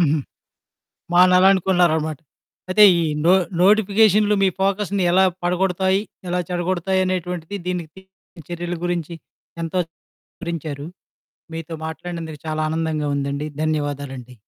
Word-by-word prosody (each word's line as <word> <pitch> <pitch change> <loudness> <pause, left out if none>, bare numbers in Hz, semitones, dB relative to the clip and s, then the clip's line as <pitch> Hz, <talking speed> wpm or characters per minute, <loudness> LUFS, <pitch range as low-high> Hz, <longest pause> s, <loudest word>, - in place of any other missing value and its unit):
హుహు. 155 -2 +3 0.9
మానాలనుకున్నారనమాట. 180 -4 +4 0.5
అయితే, 210 +3 +6 0.2
ఈ - - 0 0.2
నో 175 - +6 0.3
నోటిఫికేషన్లు 210 +1 +4
మీ 195 - +5
ఫోకస్‌ని 200 0 0
ఎలా 190 +1 +5 0.2
పడగొడతాయి, 190 +1 +1 0.3
ఎలా 180 +1 0
చెడగొడతాయనేటువంటిది, 180 0 -1
దీనికి 175 -4 -3
తగిన 190 -3 -19
చర్యల 175 0 -4
గురించి 175 -2 -2 0.5
ఎంతో 165 +3 -2 0.4
వివరించారు. 155 -5 -6 0.7
మీతో 165 0 -6
మాట్లాడినందుకు 160 -1 -6
చాలా 155 0 -2
ఆనందంగా 160 -2 -1
ఉందండి. 140 +1 -2
ధన్యవాదాలండి. 145 -5 -3
175 Hz, 100 wpm, -21 LUFS, 155-190 Hz, 0.9 s, అయితే